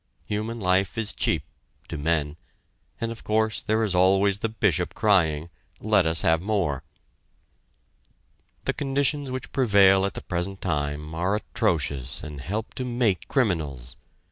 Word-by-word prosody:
Human 110 +2 -3
life 95 +1 +1
is 110 -2 -1
cheap - - 0 0.4
to - - -5
men 75 -1 0 0.6
and 115 0 -2
of 115 - -9
course 110 0 0
there 110 +1 +1
is 105 -4 0
always 95 +2 +3
the 115 - -1
Bishop 100 -6 0
crying: 85 -7 +2 0.3
"Let 105 -5 +3
us 80 0 +2
have 80 0 +3
more." 90 -9 0 1.8
The - - +1
conditions 140 0 0
which 130 0 -5
prevail 100 -6 +5
at 100 - -7
the - - -6
present 90 +2 -3
time 75 -2 -2
are 90 +5 0
atrocious 70 - -1
and 75 -3 -7
help 105 +9 -4
to 130 - -3
make 120 -6 0
criminals. 75 - -1
95 Hz, 140 wpm, -25 LUFS, 80-110 Hz, 1.8 s, prevail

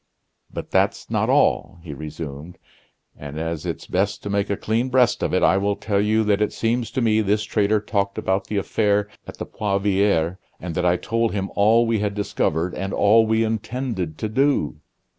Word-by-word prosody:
"But - - -7
that's - - 0
not - - +1
all," 90 - +2
he 80 -4 -7
resumed; 75 +2 -8 0.6
"and 75 +1 -8
as 80 -1 -3
it's - - -4
best 100 +3 -1
to 100 - -4
make 100 0 0
a 100 - -1
clean 115 +4 -1
breast 125 -2 +3
of - - 0
it, - - +1
I 95 - +4
will 100 +1 0
tell 100 0 0
you 110 +1 +2
that 105 -1 +1
it 105 - +1
seems 115 +1 -1
to 130 - 0
me 110 -2 +3
this 105 +1 +1
traitor 105 0 +1
talked 100 -1 -2
about 95 +1 -1
the 105 - -2
affair 105 0 +1 0.2
at - - -9
the - - -5
Poivriere, 100 -4 0 0.2
and 85 0 -5
that 90 - 0
I 90 +1 +3
told 115 +4 -1
him 100 -1 -3
all 110 +3 +4
we 115 -1 +1
had 100 -1 -2
discovered, 90 -4 -1
and 95 0 -4
all 110 +2 +4
we 110 +1 +2
intended 110 - -3
to 110 - -2
do." 130 - +1
100 Hz, 200 wpm, -22 LUFS, 95-110 Hz, 0.6 s, I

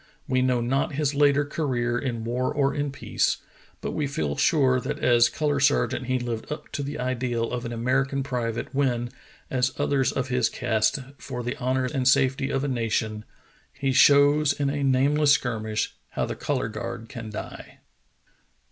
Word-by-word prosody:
We 130 0 +2
know 125 -1 +2
not 135 +5 0
his 145 0 0
later 145 0 +3
career 125 -6 -1
in 120 -4 -3
war 125 +2 -1
or 140 -2 +1
in 145 -1 -2
peace, 135 - 0 0.4
but - - -3
we 150 -2 -1
feel 75 - -2
sure 130 -5 +3
that - - -3
as 120 -1 +4
color 145 -2 0
sergeant 130 -3 +1
he 130 0 +1
lived 120 -1 -4
up 150 - -6
to - - -3
the 140 +1 -4
ideal 125 -2 -1
of 125 0 -3
an 120 - -4
American 135 +4 0
private 120 -4 -3
when, 125 -3 0 0.4
as 130 -1 +1
others 135 -3 +2
of 135 0 -2
his 125 -2 +2
caste, 110 -2 +1 0.2
for 125 -2 -6
the 125 +3 -3
honor 130 0 0
and 130 -1 -1
safet}' 135 0 +3
of 135 -1 -1
a - - 0
nation 110 -4 -1 0.2
— - - -34
"He 135 -1 +1
shows 145 +2 +5
in 140 -1 -1
a 145 0 -2
nameless 140 +2 +4
skirmish 110 -5 -1 0.2
How - - -2
the - - -4
color - - -1
guard 115 - -6
can 115 -1 -7
die." 105 - -8
130 Hz, 180 wpm, -25 LUFS, 120-140 Hz, 0.4 s, shows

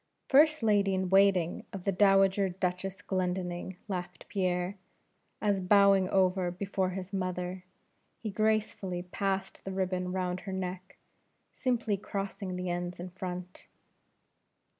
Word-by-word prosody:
"First 305 0 +5
Lady 200 -3 +3
in 185 -1 -1
waiting 190 -3 +4
to - - -4
the 195 +1 -1
Dowager 195 0 +4
Duchess 185 +1 -3
Glendinning," 180 -1 -2
laughed 180 -3 -5
Pierre, 185 -1 0 0.6
as 205 -2 +1
bowing 195 0 +5
over 185 -1 +2
before 190 +1 -1
his 185 +1 -6
mother, 185 -1 -3 0.5
he 215 - -5
gracefully 210 -3 0
passed 195 +1 -2
the - - -5
ribbon 185 -1 -1
round 180 -1 -1
her 190 0 -6
neck, 185 0 -5 0.6
simply 235 -5 0
crossing 195 -1 -4
the 180 0 -3
ends 175 0 -3
in 180 +1 -6
front. 180 0 -7
190 Hz, 125 wpm, -30 LUFS, 180-195 Hz, 0.6 s, First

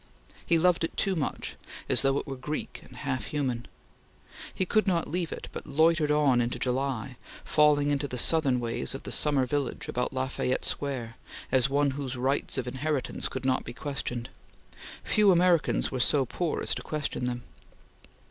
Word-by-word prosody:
He 170 - +3
loved 175 0 +3
it 165 - -3
too 195 -1 +2
much, 155 - -3 0.3
as - - +5
though 135 0 +2
it - - -2
were 135 - -5
Greek 140 +4 -5
and - - -14
half 130 -5 -3
human. 130 -6 -2 0.8
He 185 - -1
could 215 +3 +2
not 170 -3 +1
leave 175 0 -2
it, - - -6
but - - -7
loitered 155 +1 +3
on 145 -5 +4
into 120 +1 -1
July, 130 -1 -2 0.3
falling 145 -1 +4
into 145 0 0
the 125 - -5
Southern 135 -1 +3
ways 115 - -2
of - - -7
the - - -7
summer 145 -3 +2
village 140 0 -2
about 125 0 -1
La 130 0 -1
Fayette 130 -1 -1
Square, 125 -5 -2 0.3
as 130 0 +3
one 140 0 +2
whose 130 -2 -4
rights 135 +3 0
of 125 -2 -2
inheritance 135 +1 -1
could 130 0 -5
not 130 -1 +2
be 120 - -7
questioned. 125 -2 -4 0.7
Few 210 -1 +4
Americans 175 -2 +3
were 130 - -2
so 135 +2 +3
poor 165 +6 -2
as - - +1
to - - -4
question 150 -4 -3
them. 120 -1 -3
140 Hz, 180 wpm, -28 LUFS, 125-150 Hz, 0.8 s, as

